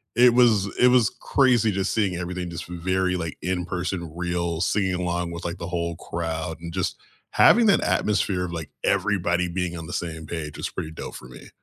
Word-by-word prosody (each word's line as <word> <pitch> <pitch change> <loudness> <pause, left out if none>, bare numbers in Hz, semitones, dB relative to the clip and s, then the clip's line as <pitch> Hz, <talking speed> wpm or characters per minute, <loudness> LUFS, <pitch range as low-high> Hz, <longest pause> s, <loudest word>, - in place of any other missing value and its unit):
it 120 0 +6
was 110 -5 +5
it 125 - +7
was 125 -4 +4
crazy 120 -5 +3
just 95 0 -1
seeing 100 -5 +1
everything 90 0 -4
just 85 0 -6
v 90 - -7
very, 95 +1 0
like, 80 -4 -4
in-person, 90 -1 -2
real, 85 -1 -2
singing 95 0 +1
along 85 -1 -2
with, 85 +1 -7
like, 85 +1 -3
the 85 - -6
whole 85 -1 -2
crowd, 80 -1 -4
and 85 -1 -7
just 95 -1 -2 0.3
having 235 0 +6
that 195 - +5
atmosphere 100 -3 +1
of, 85 - -6
like, 80 -3 -5
everybody 90 -2 +1
being 90 0 -2
on 80 - -7
the - - -7
same 80 -2 -4
page 75 -3 -5
was - - -3
pretty 80 - -5
dope - - -7
for 60 - -10
me. 65 - -12
90 Hz, 200 wpm, -24 LUFS, 85-95 Hz, 0.3 s, it